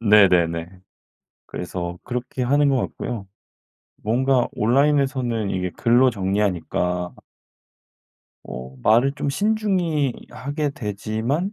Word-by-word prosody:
네네네. 90 Hz, -6 st, +4 dB, 0.8 s
그래서 90 Hz, 0 st, -5 dB
그렇게 125 Hz, +1 st, -4 dB
하는 145 Hz, +3 st, +3 dB
것 135 Hz, -, +2 dB
같고요. 115 Hz, -4 st, -4 dB, 0.8 s
뭔가 125 Hz, +3 st, +2 dB
온라인에서는 130 Hz, -3 st, +2 dB
이게 90 Hz, -1 st, -2 dB
글로 120 Hz, +2 st, +4 dB
정리하니까 95 Hz, -3 st, -1 dB, 1.3 s
어. 65 Hz, +1 st, -8 dB
말을 120 Hz, +5 st, +4 dB
좀 145 Hz, -, -3 dB
신중히 185 Hz, -, +1 dB, 0.2 s
하게 140 Hz, +4 st, -3 dB
되지만 115 Hz, -, -2 dB
120 Hz, 230 characters per minute, -22 LUFS, 95-140 Hz, 1.3 s, 네네네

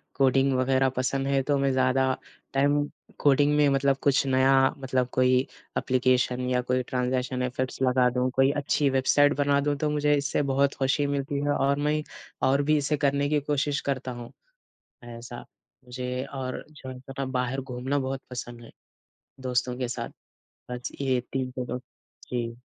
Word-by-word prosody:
Coding 135 Hz, 0 st, +3 dB
वग़ैरह 130 Hz, +1 st, +2 dB
पसंद 135 Hz, +1 st, -1 dB
है 140 Hz, -1 st, +2 dB
तो 145 Hz, +1 st, +1 dB
मैं 135 Hz, 0 st, +1 dB
ज़्यादा 130 Hz, 0 st, +2 dB, 0.5 s
टाइम 140 Hz, +1 st, +3 dB, 0.4 s
कोडिंग 145 Hz, +1 st, +4 dB
में 150 Hz, -1 st, +5 dB
मतलब 135 Hz, 0 st, +2 dB
कुछ 140 Hz, -1 st, +3 dB
नया 130 Hz, +1 st, +4 dB, 0.2 s
मतलब 130 Hz, -2 st, -1 dB
कोई 130 Hz, 0 st, +4 dB, 0.4 s
एप्लीकेशन 125 Hz, -1 st, +1 dB
या 125 Hz, 0 st, +2 dB
कोई 125 Hz, +1 st, 0 dB
ट्रांज़ेशन 125 Hz, 0 st, -1 dB
इफेक्ट्स 130 Hz, +1 st, -3 dB
लगा 125 Hz, -1 st, +4 dB
दूँ, 125 Hz, +1 st, 0 dB
कोई 135 Hz, +2 st, +3 dB
अच्छी 145 Hz, 0 st, +1 dB
वेबसाईट 140 Hz, +2 st, +3 dB
बना 140 Hz, 0 st, +3 dB
दूँ। 145 Hz, 0 st, 0 dB
तो 150 Hz, +1 st, 0 dB
मुझे 150 Hz, 0 st, +2 dB
इससे 145 Hz, +1 st, 0 dB
बहुत 140 Hz, +1 st, +2 dB
ख़ुशी 135 Hz, +2 st, +1 dB
मिलती 140 Hz, 0 st, -2 dB
है 145 Hz, -, +1 dB
और 140 Hz, 0 st, +1 dB
मैं 150 Hz, +1 st, +1 dB, 0.5 s
और 135 Hz, +2 st, +3 dB
भी 155 Hz, +1 st, +3 dB
इसे 145 Hz, +1 st, 0 dB
करने 140 Hz, 0 st, +1 dB
की 150 Hz, 0 st, +2 dB
कोशिश 145 Hz, 0 st, 0 dB
करता 130 Hz, -2 st, -2 dB
हूँ 120 Hz, -1 st, -8 dB, 0.9 s
ऐसा। 120 Hz, 0 st, -9 dB, 0.4 s
जी 125 Hz, +1 st, -3 dB
और 135 Hz, -2 st, -5 dB
जो 145 Hz, -3 st, -10 dB
है 130 Hz, -1 st, -8 dB
थोड़ा 135 Hz, +1 st, -5 dB
बाहर 130 Hz, 0 st, -2 dB
घूमना 130 Hz, +2 st, -2 dB
बहुत 135 Hz, 0 st, -3 dB
पसंद 120 Hz, -1 st, -7 dB
है -, -, -14 dB, 0.7 s
दोस्तों 125 Hz, -1 st, -1 dB
के 125 Hz, -2 st, -2 dB
साथ। 120 Hz, -, -4 dB, 0.6 s
बस 125 Hz, 0 st, -5 dB
ये 130 Hz, -2 st, +1 dB
3 130 Hz, -1 st, -2 dB
पसंद। 125 Hz, 0 st, -4 dB, 0.5 s
जी। 115 Hz, -1 st, -2 dB
135 Hz, 165 wpm, -26 LUFS, 125-140 Hz, 0.9 s, में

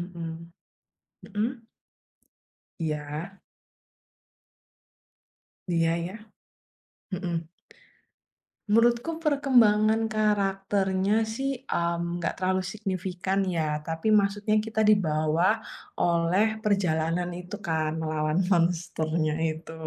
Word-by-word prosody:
mhm. 170 Hz, -1 st, -4 dB, 1.1 s
Mhm? 215 Hz, +3 st, +1 dB, 1.3 s
Iya. 155 Hz, +4 st, -4 dB, 2.3 s
Iya 165 Hz, -1 st, +2 dB
iya, 170 Hz, +2 st, -4 dB, 1.0 s
mhm. 175 Hz, -4 st, -3 dB, 1.2 s
Menurutku 240 Hz, +8 st, +3 dB
perkembangan 225 Hz, -7 st, +3 dB
karakternya 195 Hz, -2 st, +1 dB, 0.2 s
sih, 270 Hz, +2 st, -1 dB, 0.2 s
mmm, 170 Hz, 0 st, -1 dB
nggak 170 Hz, -, -1 dB
terlalu 185 Hz, 0 st, +1 dB
signifikan 190 Hz, -2 st, -2 dB, 0.2 s
ya. 150 Hz, -1 st, 0 dB
Tapi 165 Hz, +4 st, -4 dB
maksudnya 205 Hz, +2 st, 0 dB
kita 220 Hz, 0 st, -2 dB
dibawa 160 Hz, -3 st, +2 dB, 0.5 s
oleh 170 Hz, +4 st, +3 dB, 0.2 s
perjalanan 175 Hz, -4 st, +1 dB
itu 180 Hz, +3 st, -7 dB
kan 160 Hz, -1 st, 0 dB
melawan 155 Hz, 0 st, 0 dB
monsternya 165 Hz, -3 st, +1 dB, 0.2 s
itu. 160 Hz, +1 st, -6 dB
180 Hz, 80 wpm, -27 LUFS, 165-210 Hz, 2.3 s, Menurutku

